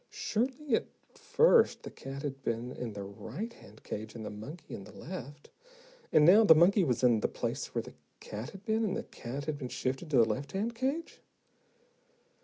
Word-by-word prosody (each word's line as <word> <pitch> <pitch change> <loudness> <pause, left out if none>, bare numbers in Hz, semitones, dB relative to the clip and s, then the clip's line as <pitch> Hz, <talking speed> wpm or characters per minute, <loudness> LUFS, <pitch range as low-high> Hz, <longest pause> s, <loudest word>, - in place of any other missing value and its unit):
Surely, 270 - -2
at - - -1 0.3
first 470 -1 +4
the - - -7
cat 135 +1 -7
had 135 -2 -4
been 120 0 -2
in 120 -3 -5
the 100 -1 -5
right 190 - -6
hand 105 - -16
cage, 110 +1 -6
and 110 -2 -6
the - - -5
monkey 130 +11 -9
in 100 - -6
the - - -12
left! 145 -4 -9 0.6
And 150 - +6
now, 200 +7 +8
the 165 -7 +8
monkey 185 +5 +5
was 130 -6 0
in 120 -3 +5
the - - +1
place - - -4
where - - 0
the - - -11 0.3
cat 110 +4 -6
had 195 +1 -12
been 220 0 +1
and 200 -3 0
the - - -3
cat 135 +4 -7
had 150 -2 -3
been 130 -3 -5
shifted 130 +6 -3
to 140 - +3
the 115 - +7
left 130 - -3
hand 215 +5 -1
cage. 270 +8 -3
145 Hz, 205 wpm, -31 LUFS, -, 0.6 s, now